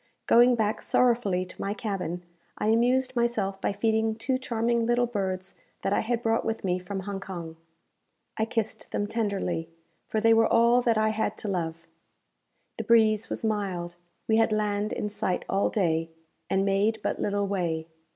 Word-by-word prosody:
Going 240 +1 +6
back 215 -2 0
sorrowfully 230 -7 +2
to 185 - -11
my 200 +1 -2
cabin, 180 -6 -3 0.3
I 215 - 0
amused 250 +4 +2
myself 215 -5 0
by - - 0
feeding 220 +1 +1
two 255 +3 -1
charming 235 -2 0
little 240 0 +3
birds 190 -4 -3 0.3
that 195 - +1
I - - +2
had 240 +1 -1
brought 225 0 +1
with 225 0 -3
me 180 -1 0
from 190 +2 -5
Hong 195 0 -5
Kong. 170 -4 -7 0.8
I 220 - 0
kissed 225 -1 -3
them 205 - -1
tenderly: 200 -6 -2 0.4
for 220 - -1
they 225 +1 +5
were 225 0 +5
all 235 +2 +5
that 235 -2 +2
I 215 0 +3
had 220 0 -1
to - - -6
love. 165 -3 -3 0.9
The - - -1
breeze 220 -2 +4
was - - -3
mild; 190 -5 -2 0.3
we 220 - +3
had 225 0 +3
land 210 0 0
in - - -2
sight 200 -3 -2
all 195 +1 +1
day, 165 -5 0 0.4
and 195 0 +2
made 200 +3 +1
but - - -2
little 205 0 0
way. 170 -5 -1
210 Hz, 175 wpm, -27 LUFS, 195-225 Hz, 0.9 s, Going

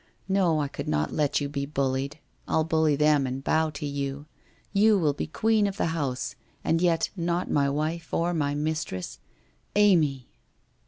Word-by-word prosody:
No, 185 -5 +2
I 145 - 0
could - - -6
not 75 0 0
let 150 -2 +1
you 145 - -2
be 140 -1 -3
bullied. 140 0 -1 0.3
I'll 160 - +2
bully 160 -2 +2
them, 150 -2 +3
and 130 +1 -4
bow 160 +2 +2
to 150 0 -6
you. 140 0 -3 0.5
You 210 +1 +5
will 155 -6 +2
be 145 - -4
queen 215 +5 +2
of 200 0 -5
the - - +1
house, 130 -5 -2 0.3
and 165 +1 +1
yet 170 -2 +2
not 175 0 -1
my 140 -1 +2
wife 155 +4 -2
or 170 +1 +1
my 145 -3 0
mistress. 150 - -3 0.6
Amy 160 -11 +3
150 Hz, 170 wpm, -27 LUFS, 140-170 Hz, 0.6 s, You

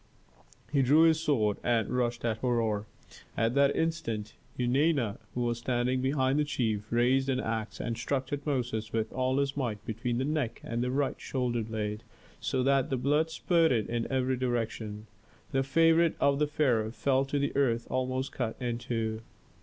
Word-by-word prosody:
He 140 - +4
drew 145 +5 +5
his 160 -1 +5
sword 110 -10 +1
and 115 -3 +1
rushed 120 -1 -1
at 110 -2 0
Herhor. 110 -4 0 0.5
At 115 +2 +2
that 140 +1 +3
instant 140 -11 -2 0.2
Eunana, 125 -2 +1 0.2
who 125 - -1
was 120 -1 0
standing 125 +1 0
behind 130 +1 +1
the - - +3
chief, 110 -7 -2
raised 130 +3 +3
an 130 -1 +1
axe 110 -2 -3
and 115 - -2
struck 130 +3 -1
Tutmosis 125 -7 -2
with 110 -1 -2
all 130 +1 0
his 140 0 0
might 115 -7 -3
between 120 +2 -2
the 130 - 0
neck 150 -6 -1
and 115 +1 -3
the 125 - 0
right 135 +1 -1
shoulder 125 -3 -1
blade, 105 -1 -3 0.4
so 130 -1 -1
that 135 0 +2
the 130 - 0
blood 145 +5 +2
spurted 160 - +2
in 120 +1 -2
every 130 -1 +1
direction. 115 -4 -2 0.5
The 135 -2 +2
favorite 165 +4 +4
of 140 0 +3
the 150 - +2
pharaoh 125 -8 +1
fell 135 +3 +1
to 145 +1 -2
the 140 0 -1
earth 120 -4 +2
almost 130 +1 -1
cut 115 -4 -3
in 120 -2 -2
two. 115 -2 -2
125 Hz, 175 wpm, -29 LUFS, 115-140 Hz, 0.5 s, drew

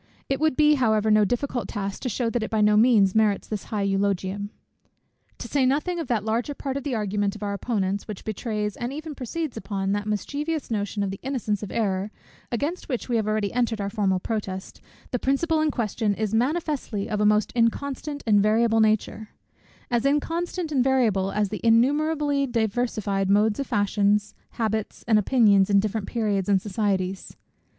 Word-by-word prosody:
It 270 -1 0
would 310 -3 +2
be 300 0 +5
however 220 -2 +3
no 215 0 +5
difficult 245 +3 -2
task 200 -2 -4
to 255 - -2
shew 230 +1 -1
that 240 - -1
it 220 - -3
by 220 - 0
no 210 0 +4
means 210 -4 +5
merits 215 -2 +2
this 210 -2 -4
high 210 -2 -2
eulogium. 200 0 -1 0.9
To - - -7
say 280 -2 +1
nothing 300 +7 +1
of 330 - -4
that 220 -4 0
larger 235 +6 -1
part 270 -1 -4
of 280 - -3
the 275 -4 -2
argument 205 -1 -1
of 215 - -8
our 200 0 -2
opponents, 200 -2 -2
which 210 -3 -7
betrays, 210 -1 -3
and 240 +1 -4
even 310 +2 -6
proceeds 275 +1 -4
upon, 195 -3 -2
that 205 +1 -1
mischievous 290 +8 -3
notion 205 -1 -1
of 195 - -2
the 195 - -7
innocence 240 -7 -2
of 205 - -5
error, 200 -3 -1 0.4
against 290 +10 -3
which 250 -1 -3
we 240 - +1
have 215 -1 -1
already 215 -2 0
entered 235 -3 0
our 200 0 -3
formal 195 -4 +1
protest, 190 -2 -5 0.3
the 250 - -1
principle 310 +5 +1
in 310 - +2
question 220 -4 -1
is 215 0 -2
manifestly 260 -4 -1
of 210 -2 -2
a - - +3
most 210 0 +2
inconstant 280 +5 -1
and 205 -3 +4
variable 225 +2 +3
nature; 220 0 +1 0.6
as 240 -1 +1
inconstant 330 +4 -1
and 265 -4 +2
variable 225 -8 +2
as 210 -1 0
the 210 - -5
innumerably 285 +4 +2
diversified 220 -4 -1
modes 210 +3 +3
of 275 - -2
fashions, 205 0 +1 0.2
habits, 220 -2 -3
and 220 -2 +5
opinions 205 -3 +4
in 200 -1 +5
different 210 0 -2
periods 205 -5 -1
and 195 -1 +4
societies. 195 -2 -2
220 Hz, 185 wpm, -25 LUFS, 205-255 Hz, 0.9 s, be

